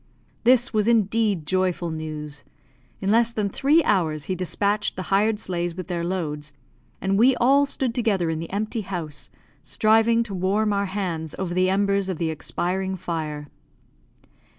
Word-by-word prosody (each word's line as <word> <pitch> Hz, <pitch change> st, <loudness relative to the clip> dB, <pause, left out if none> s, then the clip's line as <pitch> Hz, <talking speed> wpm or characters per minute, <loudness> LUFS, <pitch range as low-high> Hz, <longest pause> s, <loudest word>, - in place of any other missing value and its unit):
This 245 Hz, 0 st, +4 dB
was 215 Hz, 0 st, +1 dB
indeed 215 Hz, -5 st, +2 dB
joyful 180 Hz, -1 st, 0 dB
news. 155 Hz, -2 st, -6 dB, 0.6 s
In 195 Hz, +1 st, +1 dB
less 230 Hz, +1 st, +4 dB
than 210 Hz, -3 st, -2 dB
three 295 Hz, -, +3 dB
hours 160 Hz, -7 st, +1 dB
he 185 Hz, -, -2 dB
despatched 200 Hz, +3 st, -1 dB
the 185 Hz, +1 st, -4 dB
hired 210 Hz, +2 st, +3 dB
sleighs 175 Hz, -4 st, -3 dB
with 185 Hz, 0 st, -7 dB
their 170 Hz, -1 st, -2 dB
loads, 150 Hz, -5 st, -3 dB, 0.5 s
and 195 Hz, +1 st, 0 dB
we 255 Hz, +3 st, +5 dB
all 275 Hz, +4 st, +4 dB
stood 260 Hz, -3 st, -2 dB
together 205 Hz, -9 st, +1 dB
in 160 Hz, -, -3 dB
the 165 Hz, -, -6 dB
empty 215 Hz, +3 st, -2 dB
house, 160 Hz, -8 st, -6 dB, 0.3 s
striving 225 Hz, +8 st, +3 dB
to 215 Hz, -4 st, -8 dB
warm 200 Hz, +3 st, +1 dB
our 200 Hz, 0 st, 0 dB
hands 175 Hz, -5 st, -3 dB
over 185 Hz, -2 st, -3 dB
the 185 Hz, +1 st, +2 dB
embers 200 Hz, 0 st, +1 dB
of 185 Hz, -, -2 dB
the 165 Hz, -1 st, -1 dB
expiring 190 Hz, +4 st, -2 dB
fire. 155 Hz, -5 st, -4 dB
190 Hz, 160 wpm, -24 LUFS, 170-215 Hz, 0.6 s, we